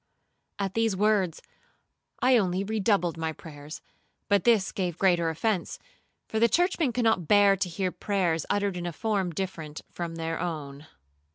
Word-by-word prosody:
At 195 -2 -2
these 225 -3 +1
words 200 -4 +1 0.8
I 255 0 +5
only 190 -4 +1
redoubled 200 -5 0
my 160 0 -2
prayers; 150 -1 -10 0.5
but 200 -2 +3
this 225 -5 +4
gave 180 -5 -3
greater 175 -3 +3
offence, 180 +3 -1 0.5
for 220 - -2
churchmen 345 -1 +1
cannot 225 -8 +1
bear 205 -1 +6
to 185 -1 -1
hear 185 +2 -2
prayers 175 -7 0
uttered 200 -2 0
in 175 0 -4
a 175 - -4
form 200 -1 -1
different 165 -3 -5
from 170 -1 -5
their 165 0 -3
own. 150 -4 -5
185 Hz, 150 wpm, -27 LUFS, 165-210 Hz, 0.8 s, bear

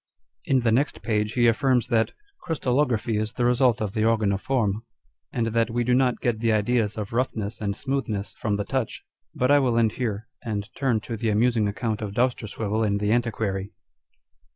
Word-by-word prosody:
' 85 0 -37
In 130 -2 +4
the 115 -1 +2
next 135 +2 +1
page 105 0 0
he 120 -1 +3
affirms 120 +1 +2
that 115 -2 +2
" 400 -2 -37
crystallography 125 -7 0
is 110 +1 -2
the 120 - 0
result 125 -1 +3
of 100 -2 -3
the 110 - 0
organ 110 -2 +2
of 100 - -3
form," 110 -6 0 0.5
and 115 - 0
that 115 0 +1
we 120 +1 0
do 125 +1 +2
not 125 -1 +2
get 120 -3 0
the 115 0 +2
ideas 110 0 +1
of 105 0 -5
roughness 115 -4 -2
and 100 -1 -1
smoothness 115 -6 -3
from 105 -2 -2
the 105 0 -2
touch. 130 -3 -2 0.3
But 125 +2 +2
I 145 - +7
will 125 -4 +1
end 115 -2 +3
here, 110 -2 -3
and 105 -3 -3
turn 125 -6 0
to 115 +1 -5
the 115 +1 -1
amusing 110 0 +2
account 110 +2 -2
of 105 -2 -4
Dousterswivel 110 -3 0
in 100 -2 +1
the 105 +1 0
Antiquary 110 -4 -1
115 Hz, 200 wpm, -25 LUFS, 105-125 Hz, 0.5 s, I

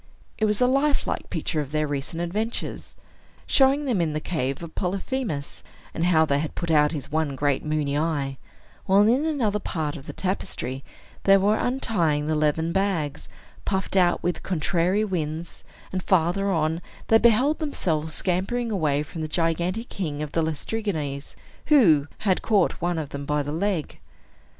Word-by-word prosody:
It 220 - +3
was 210 -1 +1
a 250 - +4
life 275 +3 +2
like - - -3
picture 155 -4 -1
of 140 -1 -7
their 155 0 +1
recent 145 +4 -3
adventures, 215 +7 -3 0.5
showing 275 +1 +4
them 235 -9 +1
in 160 -2 0
the 155 - -1
cave 150 -3 -2
of 165 - -8
Polyphemus, 195 - -3 0.3
and 165 - 0
how 160 -3 +4
they 140 -2 +1
had 155 +1 -4
put 170 -2 -2
out 150 -1 +4
his 145 -4 -6
one 155 -3 0
great 140 0 0
moony 150 -2 -1
eye; 145 -4 -1 0.5
while 200 +2 +5
in 255 +7 +3
another 235 -10 0
part 155 -6 -3
of 145 -2 -10
the - - -6
tapestry 135 -8 -3 0.4
they 195 0 +7
were 205 +2 +3
untying 180 - 0
the 155 - 0
leathern 155 +2 +1
bags, 180 -6 -1 0.3
puffed 190 0 -2
out 180 -2 +3
with 175 - -1
contrary 180 +4 +1
winds; 165 -3 -4 0.3
and 185 - -2
farther 185 +2 +2
on, 160 -1 0 0.3
they 225 - +6
beheld 245 +7 +4
themselves 160 - -1
scampering 200 +6 -1
away 150 -7 +1
from 160 +2 -7
the 155 - -2
gigantic 175 +7 -1
king 150 -6 -3
of 150 - -6
the 165 - +1
Laestrygons, 155 -3 -3 0.3
who 165 - +5
had 190 -3 +1
caught 205 -5 +2
one 175 0 0
of 155 -3 -3
them 140 0 -6
by 150 +1 0
the 145 - -4
leg. 175 -1 -2
170 Hz, 170 wpm, -25 LUFS, 150-205 Hz, 0.5 s, they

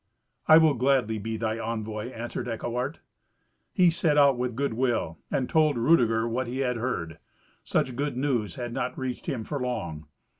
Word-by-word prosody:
"I 155 - +9
will 160 -2 +5
gladly 125 -4 +1
be 110 +2 -4
thy 110 0 -2
envoy," 110 0 -4
answered 120 0 -5
Eckewart. 120 +5 -3 0.7
He 180 -3 +4
set 160 -2 +1
out 140 -2 +6
with 125 -1 -2
good 140 -1 -1
will, 115 -10 -1
and 130 - 0
told 155 -4 +3
Rudeger 115 -4 +3
what 120 +2 -2
he 130 +3 -3
had 125 -2 0
heard. 85 -10 -3 0.4
Such 130 - 0
good 140 -1 -2
news 125 -6 -1
had 120 -2 -5
not 125 - -3
reached 130 -1 -4
him 120 -4 -2
for 145 +5 -4
long. 85 - -4
125 Hz, 175 wpm, -27 LUFS, 115-135 Hz, 0.7 s, I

